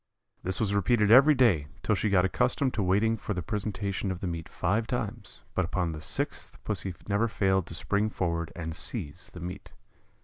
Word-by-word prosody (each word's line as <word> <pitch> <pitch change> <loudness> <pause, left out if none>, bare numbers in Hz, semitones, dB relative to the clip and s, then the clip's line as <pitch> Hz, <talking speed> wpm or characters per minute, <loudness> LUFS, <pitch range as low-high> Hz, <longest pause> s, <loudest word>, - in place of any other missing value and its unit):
This 95 -1 -1
was 100 -3 +1
repeated 105 +2 +3
every 140 +5 +8
day, 100 - +3 0.2
till - - +2
she 110 - 0
got 95 -2 +4
accustomed 125 +6 +1
to 110 - -1
waiting 105 +5 +2
for 105 -1 -4
the 90 - -3
presentation 100 0 -2
of 95 -2 -3
the - - -4
meat 85 -2 -4
five 110 +2 0
times; 115 -5 -4
but 95 - +1
upon 85 0 -1
the 75 -1 -7
sixth - - -2
Pussy 95 -3 -3
never 105 +3 +2
failed 95 -4 +1
to 85 - -5
spring 100 +7 0
forward 85 -5 -2
and 80 -2 -4
seize 90 - -2
the 90 - -10
meat. 90 +3 -7
100 Hz, 195 wpm, -28 LUFS, 90-110 Hz, 0.2 s, every